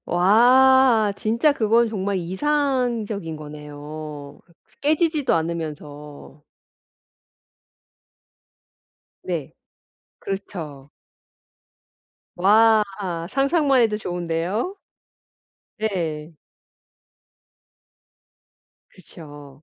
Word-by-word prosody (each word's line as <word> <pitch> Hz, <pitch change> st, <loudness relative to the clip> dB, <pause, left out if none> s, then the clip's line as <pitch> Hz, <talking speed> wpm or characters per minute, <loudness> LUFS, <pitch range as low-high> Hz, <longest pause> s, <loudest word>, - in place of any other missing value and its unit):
와. 235 Hz, +4 st, +5 dB
진짜 235 Hz, +7 st, +1 dB
그건 230 Hz, -1 st, +2 dB
정말 200 Hz, -2 st, -2 dB
이상적인 230 Hz, -, -1 dB
거네요 150 Hz, -1 st, -9 dB, 0.2 s
그 -, -, -31 dB
깨지지도 305 Hz, -1 st, +1 dB
않으면서. 150 Hz, -3 st, -6 dB, 2.8 s
네. 165 Hz, -7 st, -4 dB, 0.7 s
그렇죠. 160 Hz, -8 st, -7 dB, 1.5 s
와. 215 Hz, +4 st, +5 dB, 0.5 s
상상만 275 Hz, -, +2 dB
해도 215 Hz, -2 st, +1 dB
좋은데요. 180 Hz, -, -3 dB, 1.0 s
네. 170 Hz, -7 st, -3 dB, 2.6 s
그쵸. 145 Hz, -5 st, -14 dB
190 Hz, 120 characters per minute, -22 LUFS, 155-235 Hz, 2.8 s, 와